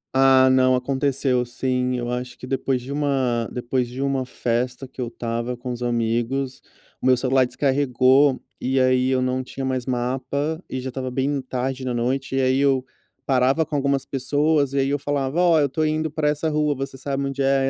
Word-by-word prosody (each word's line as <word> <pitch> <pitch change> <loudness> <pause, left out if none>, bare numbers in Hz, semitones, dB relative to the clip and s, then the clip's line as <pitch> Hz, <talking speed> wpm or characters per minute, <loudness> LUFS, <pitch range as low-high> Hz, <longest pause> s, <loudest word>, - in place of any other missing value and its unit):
Ah 135 0 +6
não, 130 0 +4
aconteceu 130 0 0
sim, 125 +1 -1
eu 120 -1 -3
acho 125 0 -4
que - - -9
depois 135 0 -1
de 130 - -7
uma 135 -5 0
depois 125 0 -1
de 125 +2 -9
uma 135 -2 -1
festa 125 +2 -2
que 130 - -9
eu 120 - -2
estava 120 +1 -4
com 125 +1 -5
os 120 0 -6
amigos, 120 +3 -1 0.4
o - - 0
meu 130 -1 +5
celular 130 +1 +2
descarregou, 135 0 +3 0.2
e 130 +1 +1
aí 130 0 +3
eu 130 -1 +1
não 130 0 -1
tinha 135 +1 -6
mais 130 -1 -2
mapa, 130 +6 -2
e 130 - -3
já 130 +1 -4
estava 130 0 -4
bem 135 +2 -1
tarde 130 +1 -3
da 125 -2 -2
noite, 130 +3 -1
e 135 - +2
aí 130 +1 +2
eu 135 -2 +2 0.4
parava 135 +4 +2
com 150 0 -5
algumas 140 -1 0
pessoas, 145 +1 +1
e - - -1
aí 135 - 0
eu 145 - 0
falava: 140 +3 -1
"Ó, 170 -3 +5
eu 145 - +3
estou 145 +3 -1
indo 155 0 0
para 155 0 -1
essa 150 +2 -1
rua, 150 -1 +1
você 135 0 -5
sabe 135 +1 -3
onde 135 0 -3
é?" 135 0 +2
130 Hz, 205 wpm, -23 LUFS, 125-140 Hz, 0.4 s, Ah